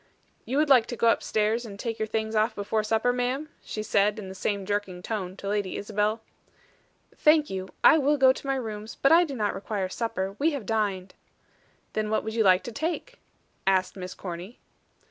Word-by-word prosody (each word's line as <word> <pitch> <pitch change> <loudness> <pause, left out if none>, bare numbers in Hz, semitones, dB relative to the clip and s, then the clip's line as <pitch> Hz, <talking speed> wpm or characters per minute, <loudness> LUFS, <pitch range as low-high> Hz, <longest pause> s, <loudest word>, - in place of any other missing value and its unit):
"You 265 - -2
would 305 +1 +3
like 255 -5 +5
to 240 - -4
go 230 - +3
upstairs 220 +1 +1
and 200 -4 -9
take 225 0 -4
your 220 - -1
things 220 0 -2
off 215 +2 +2
before 205 +2 -1
upper, 225 +2 +3
ma'am?" 255 +5 -2
she 215 - -5
said, 210 0 +2
in 200 -3 -7
the - - -7
same 195 +1 -2
jerking 195 -3 -3
tone 190 -4 -4
to 200 - -7
Lady 205 -2 -1
Isabel. 210 +2 -1 0.9
"Thank 305 -1 +4
you. 190 0 -4
I 320 - +8
will 290 +1 +2
go 260 -1 +6
to 275 - -9
my 270 - +1
rooms, 220 -3 -5
but 275 - +4
I 340 +2 +7
do 280 -4 -6
not 210 -4 0
require 195 -1 -3
supper. 195 -3 -3
We 315 +2 +2
have 270 -7 -4
dined." 200 -4 -1 0.8
"Then 215 -1 -1
what 215 - 0
would 220 - -4
you 225 -1 +2
like 185 -2 +5
to 240 - -6
take?" 330 - -4 0.5
asked 190 -1 +2
Miss 185 -1 -7
Corny. 180 +5 -7
215 Hz, 205 wpm, -27 LUFS, 200-245 Hz, 0.9 s, I